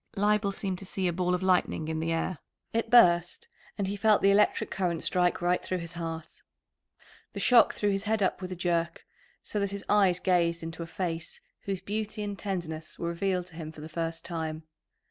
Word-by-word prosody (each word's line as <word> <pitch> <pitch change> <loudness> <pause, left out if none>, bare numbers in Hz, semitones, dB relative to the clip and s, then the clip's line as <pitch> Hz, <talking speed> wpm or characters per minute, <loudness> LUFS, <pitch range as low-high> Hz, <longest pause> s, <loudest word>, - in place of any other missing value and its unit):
Leibel 205 0 +2
seemed 190 -2 -3
to - - -7
see 190 0 -2
a 175 - 0
ball 180 +1 +1
of 180 - -4
lightning 180 -4 +1
in 160 0 -2
the 165 +1 -1
air; 165 0 -1 0.3
it 230 0 0
burst, 180 - +5 0.3
and 200 - 0
he 200 - -2
felt 210 +1 +3
the 200 - +6
electric 205 +1 +3
current 175 -4 -1
strike 180 -1 +2
right 180 +1 +2
through 185 - -2
his 170 -1 -5
heart. 165 -1 -6 0.9
The - - -5
shock 240 -3 +5
threw 205 -1 +1
his 195 +1 -1
head 215 -1 +1
up 185 - 0
with 185 0 -5
a - - -3
jerk, 170 -1 -1 0.4
so 210 - -3
that 200 0 0
his 200 0 -6
eyes 195 -4 +4
gazed 170 -3 +1
into 165 +1 -6
a 165 - -5
face 170 -2 -4 0.3
whose 195 -2 -2
beauty 215 +2 -3
and 205 -1 -3
tenderness 170 -6 -4
were 170 - -2
revealed 180 +1 -1
to 165 - -16
him 160 -2 -6
for 155 - -12
the 155 - -7
first 165 0 -3
time. 160 -2 -4
180 Hz, 210 wpm, -29 LUFS, 170-200 Hz, 0.9 s, the